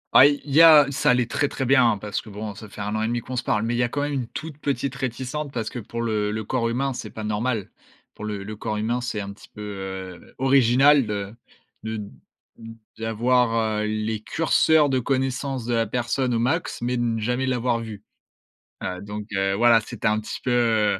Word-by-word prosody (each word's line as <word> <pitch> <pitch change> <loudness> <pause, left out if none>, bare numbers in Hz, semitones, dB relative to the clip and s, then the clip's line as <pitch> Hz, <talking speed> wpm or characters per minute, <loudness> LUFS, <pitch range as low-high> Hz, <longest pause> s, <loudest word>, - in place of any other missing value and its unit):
Ah 135 - +10
i 145 0 0
il 145 - -7
y 160 - +7
a 155 -3 +9
ça 135 - +1
allait 125 0 +4
très, 145 +5 0
très 135 - -3
bien, 125 -2 +5
hein, - - -4
parce 105 +1 -4
que 110 - -13
bon, 105 +1 -6
ça 105 +1 -11
fait 105 - -9
1 105 +1 -3
an 110 - -1
et 110 - 0
demi 120 +1 -1
qu'on 130 - -7
se 125 - 0
parle, 105 - 0
mais 115 +1 -1
il - - -1
y - - +3
a 120 - 0
quand 145 - -2
même, 145 0 -1
une 130 -4 -2
toute 155 +3 -8
petite 140 -2 -2
réticence. 130 +3 -4
Parce 115 -4 -3
que 125 - -5
pour 115 +2 -5
le 105 -2 0
le 110 +1 -3
corps 115 +2 -1
humain, 135 +3 -1
c'est 110 -3 -6
pas 110 - -8
normal. 105 0 -2 0.4
Pour 105 - -8
le 105 -2 -4
le 105 +2 -7
corps 105 0 -3
humain, 115 +4 -1
c'est 120 -3 -3
un 100 0 -6
petit 100 - -17
peu, 105 - -11
heu, 95 -3 -7
original 135 +1 +5
de 100 -1 -4 0.5
de 110 +1 -4
d 105 -1 -7 0.9
d'avoir, 115 -1 +1
heu, - - -1
les 110 0 -2
curseurs 160 +2 +3
de 130 -1 +1
connaissance 130 0 -1
de 120 - -1
la 115 -1 +1
personne 125 +2 -1
au - - +1
max, 145 +9 -1
mais 125 +1 0
de - - -1
ne 115 -1 0
jamais 125 +4 -1
l'avoir 125 -2 0
vu. 110 -3 -8 0.8
Heu, 90 0 -4
donc 105 +1 -6
heu, 95 0 +1
voilà, 115 +1 +5
c'était - - -4
un 105 0 +2
petit 110 - -6
peu, 125 - 0
heu 110 -5 +2
115 Hz, 235 wpm, -24 LUFS, 105-130 Hz, 0.9 s, Ah